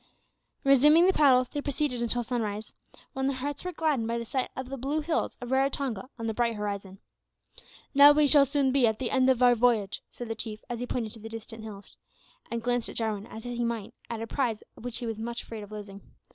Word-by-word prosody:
Resuming 295 +5 +6
the 380 - +4
paddles, 255 -5 +5
they 290 - -3
proceeded 280 -3 -1
until 240 +1 +1
sunrise, 220 -3 -3 0.4
when 265 0 -1
their 275 -1 -1
hearts 285 +2 -4
were 365 - -3
gladdened 305 -9 0
by 235 0 -1
the 235 - -4
sight 260 +2 -2
of 260 -1 -5
the 275 - -4
blue 275 +4 -2
hills 320 +1 -1
of 245 0 -7
Raratonga 265 -3 0
on 230 - -5
the 220 - -1
bright 235 0 0
horizon. 200 -2 -5 1.0
"Now 285 +1 +9
we 295 0 +4
shall 285 -1 +7
soon 275 -1 +1
be 260 -3 +4
at 220 -1 0
the 255 -1 -3
end 260 0 +3
of 255 -1 +3
our 245 -1 +7
voyage," 230 -4 +1
said 240 - -8
the 225 - -2
Chief, 220 -1 -5
as 235 - -3
he 245 - -4
pointed 225 -4 -3
to 225 - -10
the 225 +1 -8
distant 225 0 -9
hills, 205 -2 -10 0.5
and 235 -1 -3
glanced 245 -1 0
at - - -9
Jarwin 215 -2 -2
as 220 - -9
he 240 0 -3
might 230 -1 -3 0.2
at 225 -1 -4
a - - -3
prize 230 -3 -2
which 245 0 -6
he 245 - -5
was 225 -1 -4
much 235 +1 -4
afraid 225 -2 -8
of 205 0 -11
losing. 200 -2 -8
240 Hz, 230 wpm, -28 LUFS, 225-270 Hz, 1.0 s, Now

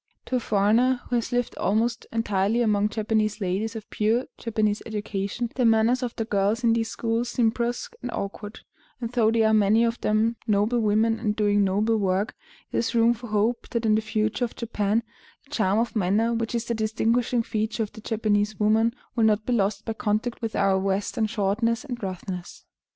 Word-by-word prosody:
To 255 - 0
a - - 0
foreigner 230 +4 +2
who - - +2
has 235 - -3
lived 245 -1 -1
almost 225 +4 0
entirely 225 0 +1
among 210 -2 +2
Japanese 215 -1 0
ladies 200 +3 -2
of 220 -2 -7
pure 225 +4 +1
Japanese 215 -2 -1
education, 210 +2 -3
the 255 - 0
manners 230 +2 +3
of 245 -2 -3
the 225 - -2
girls 210 +2 0
in 230 -1 +4
these 225 -1 0
schools 230 +1 -1
seem 235 -2 +2
brusque 240 - -3
and - - -4
awkward; 205 +1 -6 0.4
and 235 -2 -4
though 235 -3 +3
they 225 0 +2
are 220 0 +3
many 215 +2 +4
of 235 0 -1
them 220 +2 +1
noble 210 +3 +2
women 220 +1 +2
and 210 -2 -1
doing 205 -1 +2
noble 210 +4 +1
work, 195 +1 0 0.4
there - - 0
is 235 - -1
room 230 +1 +5
for 240 +1 -9
hope 215 +3 0
that 235 -1 -2
in 215 - +4
the 215 - +3
future 215 +2 -1
of 235 - -9
Japan 220 -1 -1 0.4
the 285 - -26
charm 205 -7 +1
of 235 +1 0
manner 215 +4 +2
which 230 0 -2
is 235 0 -1
the 235 - -1
distinguishing 230 +2 +1
feature 220 +1 -2
of 215 - -6
the 220 - -12
Japanese 210 -2 0
woman 220 +2 +3 0.2
will 230 -2 +3
not 215 0 +2
be 250 - 0
lost 205 -2 0
by 225 - -2
contact 220 +3 -2
with 225 -1 -3
our 195 -1 +3
Western 195 +4 -1
shortness 220 +2 0
and 245 -4 -6
roughness. 185 -2 -6
220 Hz, 200 wpm, -25 LUFS, 210-230 Hz, 0.4 s, room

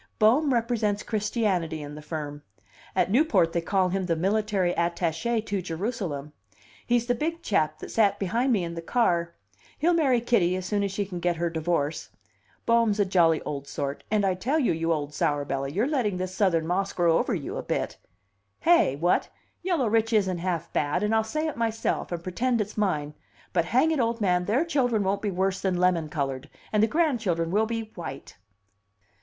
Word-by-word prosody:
Bohm 255 +7 +4
represents 225 -4 0
Christianity 200 -8 -1
in 145 0 -8
the 150 - -8
firm. 150 -1 -5 0.5
At - - +2
Newport 205 - +3
they 170 - +1
call 185 +1 +1
him 190 0 -1
the 165 - +1
military 195 0 +1
attache 170 +7 0
to 205 -3 -3
Jerusalem. 165 - -4 0.5
He's 240 -1 +2
the 245 - +1
big 330 +6 -3
chap 155 - +1
that - - -9
sat 205 -3 +3
behind 230 +7 0
me 205 -6 +2
in 170 0 -4
the 170 - -5
car. 170 -4 +1 0.4
He'll 340 +4 +2
marry 275 -7 +3
Kitty 215 -7 +2
as 185 -1 -4
soon 205 +1 0
as 200 -1 -1
she 200 +1 -2
can 180 -2 -6
get 175 0 0
her 170 0 -1
divorce. 160 -2 -1 0.6
Bohm's 230 -3 +3
a 205 - +4
jolly 170 -4 +3
old 140 -1 -5
sort 140 0 -4
and 210 -2 +2
I 190 - +2
tell 250 +12 -1
you, 275 -7 +2
you 165 +1 -1
old 150 -2 -2
sourbelly, 140 -2 -1
you're 205 - +1
letting 250 -10 0
this 185 0 -4
Southern 185 -5 +2
moss 190 +4 -1
grow 170 -2 +3
over - - 0
you - - -5
a - - -2
bit. - - -3 0.6
Hey? 335 - +4
What? 170 +5 +1 0.3
Yellow 345 -8 +1
rich 225 +1 +1
isn't 190 -5 +2
half 170 -2 -3
bad, 150 +6 0
and 210 +1 +1
I'll 220 0 +3
say 305 +8 -2
it 310 - -3
myself, 225 -4 -1
and 170 -1 -4
pretend 235 +7 0
it's 210 0 -3
mine; 155 -8 -1 0.4
but 170 -2 +2
hang 260 - +3
it, 315 - 0
old 230 -1 0
man, 180 -4 +1
their 245 - +1
children 245 -9 +1
won't 195 +1 0
be 210 - -1
worse 190 +1 -1
than 185 -2 0
lemon 175 -3 +2
colored, 140 -2 -3 0.2
and 210 - +3
the 220 - +5
grandchildren 220 - 0
will 215 +3 +2
be 225 -1 -4
white!" 140 -6 -8
195 Hz, 195 wpm, -26 LUFS, 170-230 Hz, 0.6 s, the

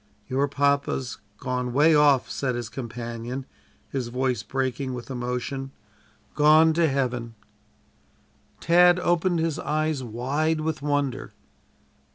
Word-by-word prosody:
"Your 135 +2 +1
papa's 140 -2 0 0.2
gone 125 -1 -3
'way 150 +4 +5
off" 145 -3 +4
said 130 -3 -2
his 120 -2 -4
companion, 120 +1 -6 0.5
his 130 -3 -2
voice 125 -1 -1
breaking 130 +2 -2
with 120 +2 -8
emotion 125 +2 -3 0.6
"gone 155 +2 +5
to 165 -1 +2
heaven." 125 -4 -2 1.2
Tad 175 +1 +5
opened 175 0 +1
his 160 -2 -1
eyes 155 -2 -1
wide 140 +7 -1
with 155 -2 -2
wonder. 145 -3 -2
135 Hz, 115 wpm, -25 LUFS, 125-155 Hz, 1.2 s, way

